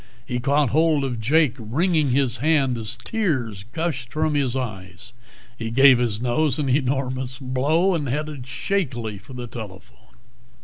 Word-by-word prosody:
He 125 -1 -2
caught 140 +2 +2
hold 155 -1 +3
of 125 -4 -3
Jake, 145 +3 +3
wringing 150 - +1
his 130 -1 +1
hand 140 -4 +2
as 110 -2 -5
tears 130 - -2
gushed 150 -7 -3
from 155 +1 0
his 135 -4 0
eyes. 105 -4 -6 0.4
He 115 -2 -4
gave 130 +1 +6
his 115 -4 0
nose 125 +3 +1
an 145 -3 -1
enormous 130 -1 -1
blow, 145 +8 +1
and 150 -6 -1
headed 150 -1 -4
shakily 125 - -2
for 130 +8 -14
the 125 -1 -6
telephone. 95 - -11
130 Hz, 150 wpm, -23 LUFS, 120-150 Hz, 0.4 s, gave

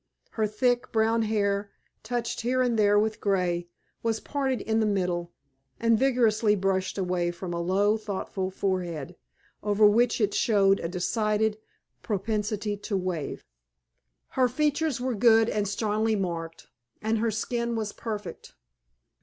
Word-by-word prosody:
Her 220 -2 0
thick, 245 +3 0
brown 225 +1 +2
hair, 205 -2 0 0.3
touched 235 +1 -3
here 255 +2 +1
and 245 -2 +1
there 205 0 +4
with 215 +1 0
grey, 180 -3 0 0.3
was 225 -1 0
parted 270 -3 -1
in 220 0 0
the 220 - +2
middle 180 -4 -1 0.5
and 230 0 +4
vigorously 230 -5 +3
brushed 190 -1 -1
away 180 -2 0
from 175 0 -5
a 170 - -2
low, 200 +5 +2
thoughtful 195 -2 -4
forehead, 180 -4 -3 0.5
over 210 +1 +3
which 230 +4 +4
it 210 -2 +1
showed 195 -3 +3
a - - -3
decided 210 +4 0 0.4
propensity 210 0 -2
to 200 0 -2
wave. 180 -6 -4 0.8
Her 255 -1 +2
features 300 +1 0
were 255 0 -1
good 225 +1 +5
and 210 -1 -1
strongly 215 +2 0
marked, 170 -4 -4 0.3
and 220 +1 0
her 230 +1 +1
skin 235 +2 -2
was 215 -2 -3
perfect. 210 -6 -6
210 Hz, 140 wpm, -27 LUFS, 190-225 Hz, 0.8 s, good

